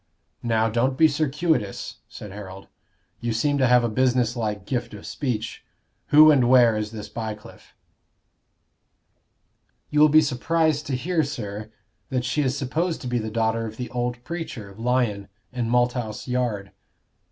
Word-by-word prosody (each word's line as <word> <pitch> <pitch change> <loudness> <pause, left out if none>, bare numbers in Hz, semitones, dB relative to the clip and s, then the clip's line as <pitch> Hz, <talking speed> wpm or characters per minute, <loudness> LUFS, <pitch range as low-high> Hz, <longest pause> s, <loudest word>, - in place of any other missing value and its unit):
"Now, 115 -1 +1
don't 120 +4 0
be 160 - +7
circuitous," 150 - -1
said 105 - -9
Harold. 95 -1 -9 0.5
"You 120 -1 -2
seem 145 +5 +1
to 130 - +4
have 125 0 +5
a - - +2
business 125 0 +1
like 105 -4 -3
gift 120 -2 -3
of 100 - -11
speech. 115 -6 -3 0.4
Who 155 +1 +8
and 130 -5 +4
where 120 -3 +6
is 105 0 -2
this 110 -1 -7
Bycliffe?" 110 -2 -8 2.2
"You 150 - +2
will 155 0 +7
be 155 +1 +6
surprised 155 +3 0
to 135 - -1
hear, 165 +6 0
sir, 110 -6 -6 0.4
that 125 -2 -1
she 150 - 0
is 130 -1 0
supposed 160 +6 -1
to 125 - -5
be 125 -1 0
the 110 0 -4
daughter 115 0 0
of 110 0 -9
the 125 - -5
old 120 0 -3
preacher, 130 - -6
Lyon, 115 -3 0 0.3
in 120 -2 -2
Malthouse 120 -3 0
Yard." 120 -6 -2
125 Hz, 155 wpm, -24 LUFS, 110-140 Hz, 2.2 s, Who